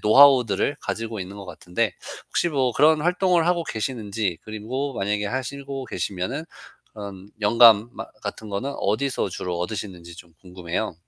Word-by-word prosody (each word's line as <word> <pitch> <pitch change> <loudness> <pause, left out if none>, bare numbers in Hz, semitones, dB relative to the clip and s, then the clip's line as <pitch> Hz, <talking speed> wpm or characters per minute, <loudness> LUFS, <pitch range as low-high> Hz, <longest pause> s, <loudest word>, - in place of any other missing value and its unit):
노하우들을 125 0 +5
가지고 115 -1 -4
있는 95 +1 -6
것 100 -2 -9
같은데 90 +6 -2 0.3
혹시 175 - +1
뭐 130 -5 +1
그런 155 +3 +5
활동을 180 +1 +2
하고 170 -2 +1
계시는지 110 - -2
그리고 120 +6 -4
만약에 105 0 -1
하시고 135 +3 -4
계시면은 100 - -3 0.5
그런 100 -2 -9
영감 115 0 +7
마 - - -6 0.2
같은 110 - -6
거는 105 +8 -3
어디서 110 +2 0
주로 90 0 -4
얻으시는지 90 -3 -5
좀 85 -2 -14
궁금해요. 90 +2 -4
110 Hz, 350 characters per minute, -24 LUFS, 100-135 Hz, 0.5 s, 영감